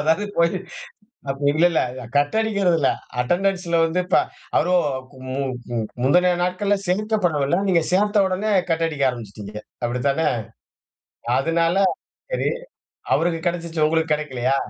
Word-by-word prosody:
அதாவது 160 +6 +2
இப்போ 200 - +1 0.9
அப்ப 135 0 -3
இல்ல 155 +4 +3
இல்ல 130 -5 -1
கட் 145 +7 +2
அடிக்கிறதுல, 195 -9 +2 0.3
அட்டெண்டன்ஸ்ல 175 +4 0
வந்து 170 +3 0 0.6
அவர் 170 - +2 0.6
மு 130 - -4 0.4
மு 120 - -1 0.3
முந்தனய 180 +6 +4
நாட்கள்ல 185 +3 +1
சேர்க்கப்படவில்ல. 180 -6 +1
நீங்க 175 -3 +4
சேர்த்தவுடனே 205 +1 +2 0.2
கட் 165 0 +1
அடிக்க 150 -3 -2
ஆரம்பிச்சுட்டீங்க. 105 -3 -8 0.3
அப்டித்தானே? 140 +6 0 1.1
அதனால 165 +5 +1 0.6
சரி. - - +1 0.6
அவருக்கு 165 0 +1
கெடச்சுருச்சு. 170 -2 0
உங்களுக்கு 160 0 +1
கெடைக்கலையா? 135 -3 -1
165 Hz, 110 wpm, -22 LUFS, 140-180 Hz, 1.1 s, முந்தனய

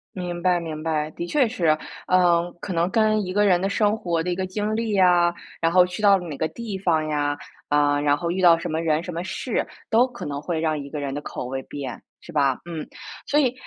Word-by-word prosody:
明 175 -2 -4
白 180 0 +3
明 160 -2 -6
白， 155 -1 -1
的 170 - -5
确 270 +4 +3
是。 170 -9 +1 0.3
嗯， 175 -1 +3
可 185 - -5
能 170 +2 +1
跟 215 -1 +2
一 185 - -4
个 205 +1 +3
人 180 -3 +4
的 195 - 0
生 210 +1 +2
活 170 -6 -1
的 180 - -2
一 175 - -1
个 190 - -2
经 210 +3 -2
历 220 -2 -1
啊， 175 -1 +5 0.3
然 165 - +2
后 180 0 +6
去 180 +3 -6
到 200 -2 +6
了 180 -2 -7
哪 150 - -5
个 160 - 0
地 220 +1 -6
方 165 -5 +1
呀， 145 -1 0 0.3
呃， 145 0 +3
然 145 0 +3
后 170 +3 -2
遇 185 +2 -1
到 170 -2 +7
什 170 +1 -5
么 160 +1 -1
人、 160 -1 +1
什 180 - -6
么 170 +2 -3
事， 220 +5 -2 0.2
都 235 +3 +4
可 245 -2 -9
能 140 -1 -4
会 165 +1 -2
让 155 -1 0
一 140 0 -7
个 150 0 -5
人 140 -1 -3
的 145 - -4
口 125 - -6
味 135 +1 -4
变， 140 -2 -7 0.2
是 - - -12
吧？ 140 -4 +2
嗯， 165 -3 -6 0.4
所 295 - +3
以 255 -4 +2
175 Hz, 270 characters per minute, -24 LUFS, 155-195 Hz, 0.4 s, 到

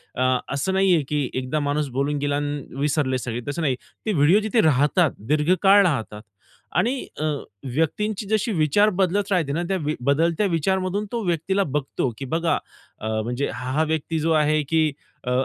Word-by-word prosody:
अ, 130 - 0 0.3
असं 170 +8 -1
नाहीये 190 -4 +3
की 145 -3 0
एकदा 130 +4 -2
माणूस 145 0 -1
बोलून 145 +1 0
गेला 145 0 0
अन् 145 -1 -2 0.2
विसरले 140 -3 +1
सगळे, 120 -1 -4
तसं 165 +4 -3
नाही. 135 -4 +1 0.3
ते 215 - 0
व्हिडिओ 160 +5 +5
जिथे 220 +1 +2
राहतात 150 +3 +3 0.2
दीर्घकाळ 185 +7 +4
राहतात 110 -9 -2 0.6
आणि 245 +4 +2 0.3
अ, - - 0 0.5
व्यक्तींची 205 - -1
जशी 220 +2 0
विचार 160 +7 +3
बदलत 200 +2 +1
राहते 165 -7 +1
ना. 170 - -1
त्या 190 - +1
वी 150 - 0
बदलत्या 160 +8 +2
विचारमधून 190 +4 0
तो 235 - -2
व्यक्तीला 180 +3 +1
बघतो 140 -4 -2
की 135 - -5
बघा 165 +5 0 0.4
अ, 110 - -5 0.2
म्हणजे 125 +4 -2
हा-हा 130 +5 -1
व्यक्ती 160 +1 -1
जो 160 +1 0
आहे 155 +1 +2
की 160 -2 +2 0.3
अ, 125 - -3
155 Hz, 170 wpm, -23 LUFS, 140-185 Hz, 0.6 s, व्हिडिओ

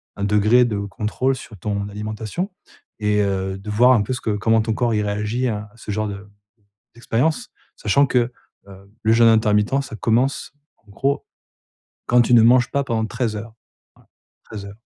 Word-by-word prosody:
un 100 - -5
degré 105 +4 +4
de 115 -4 -1
contrôle 105 +6 -2
sur 115 -4 -11
ton 100 +2 -3
alimentation 110 - -5 0.5
et 105 0 +1
heu, 95 -1 -1
de 100 +2 -9
voir 120 +5 +5
un 120 -5 +4
peu 105 +5 -2
ce 125 - -5
que - - -3
comment 110 +2 +2
ton 110 0 -1
corps 120 +1 0
il 105 - +1
réagit 105 +5 -1
à 105 -1 -5
à - - -22
ce 110 -2 -7
genre 110 +1 -1
de 100 0 -7 0.7
d'expérience, 125 +6 -1 0.2
sachant 140 +7 +2
que, 125 -1 +1 0.4
heu, 100 0 -15
le 110 0 +4
jeûne 115 0 +5
intermittent, 110 +4 +3
ça 110 - -8
commence, 120 +5 0 0.3
en 105 - -28
gros, 135 +8 -2 0.8
quand 125 0 +4
tu 120 - +2
ne 115 - +7
manges 120 +1 +5
pas 140 - +1
pendant 115 -4 -1
13 115 -2 -2
heures, 110 +1 -8 0.4
voilà, - - -26 0.4
13 105 -2 -8
heures. 100 - -10
110 Hz, 190 wpm, -21 LUFS, 105-120 Hz, 0.8 s, ne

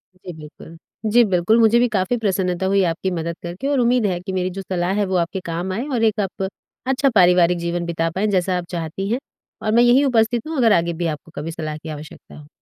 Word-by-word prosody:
जी 180 -1 -10
बिल्कुल। 155 +2 -12 0.3
जी 240 +1 +6
बिल्कुल, 195 +4 +2
मुझे 230 +1 +5
भी 245 - +3
काफ़ी 210 +3 0
प्रसन्नता 190 -4 -1
हुई 195 0 +3
आपकी 185 +3 -3
मदद 170 -1 -3
करके 175 +11 -5
और 285 -2 +1
उम्मीद 240 -2 +2
है 180 -3 0
कि 190 +1 -6
मेरी 185 0 -1
जो - - -3
सलाह 180 -1 -2
है, 205 0 +1
वो 190 - -2
आपके 175 +3 -1
काम 170 +3 -3
आए 245 +8 -3
और 230 - 0
एक 220 -1 +2
आप 195 -1 -2 0.4
अच्छा 270 +1 +2
पारिवारिक 180 -2 +5
जीवन 170 0 -2
बिता 165 -1 -1
पाएँ 200 +3 +1
जैसा 185 -2 +1
आप 175 - -4
चाहती 170 +3 -4
हैं। 245 - 0 0.4
और 215 - -1
मैं 235 +2 +5
यहीं 255 +4 +5
उपस्थित 235 +1 +1
हूँ, 320 -2 -4
अगर 230 -4 +4
आगे 170 0 +1
भी 170 +1 -3
आपको 155 +2 -19
कभी 155 +3 -4
सलाह 155 -1 -5
की 160 +1 -10
आवश्यकता 150 0 -10
हो। 150 - -14
185 Hz, 240 wpm, -21 LUFS, 170-225 Hz, 0.4 s, जी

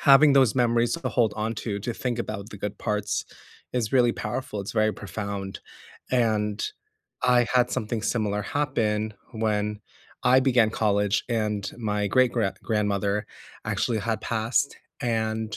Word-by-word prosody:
having 140 +1 +7
those 130 -5 +5
memories 120 -2 +2
to 170 - -2
hold 115 -4 +2
on 110 +2 -1
to, 105 -3 -3
to 120 +3 -3
think 125 -2 -2
about 105 -2 -4
the 105 - -9
good 105 0 -4
parts 105 -2 -1 0.5
is 120 -3 -1
really 120 -2 +5
powerful, 105 -1 -4
it's 100 - -5
very 110 0 +2
profound, 100 -1 -5 0.5
and 110 -4 +1 0.6
I 125 -1 +4
had 125 -1 +3
something 110 0 -2
similar 105 -3 0
happen 110 -6 0 0.2
when 105 -2 -1 0.4
I 130 +1 +6
began 125 -4 +4
college 105 -1 +1
and 105 -3 -1
my 105 -2 0
great 130 +1 +4
gra 110 -5 +1
grandmother 105 -1 0 0.4
actually 115 -3 0
had 110 +1 -1
passed, 115 +5 0 0.2
and 110 -3 -1
110 Hz, 145 wpm, -26 LUFS, 105-120 Hz, 0.6 s, having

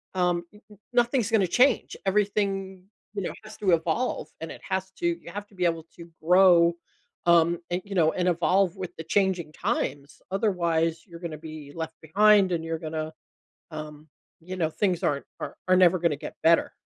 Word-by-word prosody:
um, 175 -1 +1
n 210 - -16
n-nothing's 240 +2 0
gonna 205 -5 +3
change. 250 +6 +3
Everything, 195 -1 0 0.3
you 205 - -3
know, - - -3
has 215 0 -11
to 195 -3 +1
evolve 175 +9 0
and 165 - -5
it - - -10
has 190 0 -2
to - - -2 0.2
you 170 - -10
have 205 +2 -6
to 205 - -22
be 180 - -2
able 165 -2 0
to 170 -1 -12
grow, 175 0 +6 0.5
um, 170 0 +4
and, 175 +1 -1
you 200 - -7
know, 160 -3 +4
and 180 0 0
evolve 180 +2 +2
with 185 -2 -6
the 160 - -6
changing 185 -3 +1
times. 140 -1 -3
Otherwise, 170 -5 0
you're 170 -2 -11
gonna 165 -3 -6
be 155 -2 -9
left 160 -1 -5
behind 200 +3 +4
and 165 -2 -1
you're 165 0 -3
gonna 155 0 -4 0.6
um, 155 0 -8 0.3
you 185 +3 -7
know, 165 -3 +1
things 180 +1 -1
aren't 140 -1 0
are - - -6
are 185 - +6
never 185 0 +5
gonna 165 -3 +1
get - - -8
better. 165 +1 +4
175 Hz, 185 wpm, -26 LUFS, 165-195 Hz, 0.6 s, grow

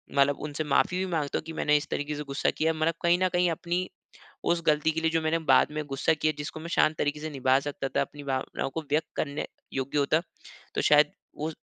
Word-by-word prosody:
मतलब 140 0 +4
उनसे 150 +1 -3
माफ़ी 155 +5 +2
भी 190 - 0
माँगता 150 -4 0
हूँ - - -9
की 165 - -6
मैंने 150 -1 +2
इस 145 - -4
तरीके 145 +1 -2
से 150 - -4
गुस्सा 140 0 0
किया 160 +1 +2
मतलब 160 +1 +1
कहीं 170 0 +4
न - - +5
कहीं 175 0 +3
अपनी 175 +3 -2 0.5
उस 170 0 +1
गलती 150 +1 +3
के 160 +1 -2
लिए 160 - +2
जो 165 0 +1
मैंने 160 +1 +1
बाद - - +5
में 150 0 -3
गुस्सा 135 +3 +1
किया 155 0 0
जिसको 145 +2 -5
मैं 165 - -7
शांत 155 0 +4
तरीके 145 +1 -1
से 155 +1 -4
निभा 135 -2 +2
सकता 140 -1 -3
था - - +4
अपनी 145 -1 -5
भावनाओं 135 -1 -2
को 160 - -1
व्यक्त 155 +2 +2
करने 145 -1 -2 0.3
योग्य 135 +2 -2
होता 155 +3 +2 0.5
तो - - +1
शायद 150 0 +6 0.3
वो 155 +2 -2
150 Hz, 235 wpm, -28 LUFS, 145-160 Hz, 0.5 s, शायद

